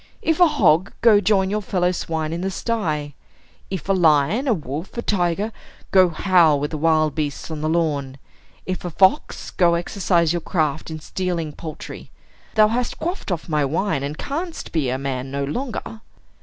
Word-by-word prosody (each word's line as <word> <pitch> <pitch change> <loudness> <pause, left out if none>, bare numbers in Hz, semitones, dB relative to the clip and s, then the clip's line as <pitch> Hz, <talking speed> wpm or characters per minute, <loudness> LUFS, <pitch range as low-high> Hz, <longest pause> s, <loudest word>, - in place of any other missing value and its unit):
If 320 0 +1
a 355 - +7
hog, 200 - +3
go 220 -3 +6
join 190 -1 +2
your 210 +1 0
fellow 180 -2 0
swine 160 -3 -3
in 170 - -3
the 190 - -1
sty; 160 -9 -2 0.6
if 190 -5 -5
a 195 - +3
lion, 170 - +3
a 245 - +4
wolf, 155 - -6
a 235 - -2
tiger, 195 +2 0 0.4
go 185 -2 +6
howl 165 -3 +4
with 145 +1 -3
the 155 - -3
wild 155 -1 +2
beasts 150 0 -3
on 155 -1 -5
the 155 - 0
lawn; 145 -5 -1 0.5
if 185 -1 -4
a 175 - -3
fox, 190 +3 +2
go 170 -2 +3
exercise 170 -1 +1
your 175 - -1
craft 155 -4 -1
in 160 -1 -6
stealing 170 -1 -3
poultry. 155 -1 -8 0.5
Thou 215 -1 +6
hast 240 +2 -2
quaffed 345 - -4
off 170 -3 -3
my 150 -3 +1
wine, 160 +2 0
and 145 +2 -4
canst 325 +4 -5
be 150 -6 0
man 135 -1 -4
no 140 +1 -2
longer." 225 - -4
170 Hz, 180 wpm, -22 LUFS, 155-200 Hz, 0.6 s, a